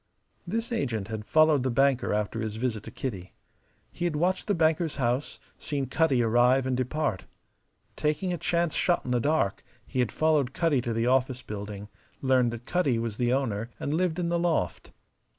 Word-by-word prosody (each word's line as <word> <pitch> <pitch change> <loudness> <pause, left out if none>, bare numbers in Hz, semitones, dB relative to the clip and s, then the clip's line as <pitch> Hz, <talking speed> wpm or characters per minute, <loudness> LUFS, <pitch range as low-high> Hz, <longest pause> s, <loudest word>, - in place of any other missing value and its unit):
This 225 +6 -2
agent 115 - -2
had 110 -1 -5
followed 155 -3 +4
the 130 - 0
banker 135 0 +2
after 105 +2 -1
his 110 -1 -3
visit 110 -2 -2
to - - -7
Kitty. 95 -8 -5 0.6
He 175 - -4
had 170 -3 0
watched 180 +5 0
the 205 - +2
banker's 160 -1 +1
house, 125 +1 -1 0.2
seen 140 -2 -2
Cutty 135 -2 +2
arrive 120 +3 +4
and 130 -1 0
depart. 130 -4 -1 0.7
Taking 155 +5 -1
a 175 - -4
chance 170 0 0
shot 175 - +1
in 125 - -3
the 125 - +2
dark, 145 -6 0 0.2
he 130 - -4
had 125 -3 +1
followed 150 -5 +1
Cutty 160 -7 +2
to 120 -1 -2
the 115 +1 0
office 130 0 +1
building, 105 -1 -6 0.3
learned 130 -2 +3
that 120 0 -7
Cutty 145 -9 +1
was 115 -2 -3
the 120 -1 +1
owner 115 -4 -1
and 145 - -2
lived 170 0 0
in 175 -2 -1
the 170 0 +1
loft. 165 - -1
130 Hz, 185 wpm, -27 LUFS, 115-160 Hz, 0.7 s, followed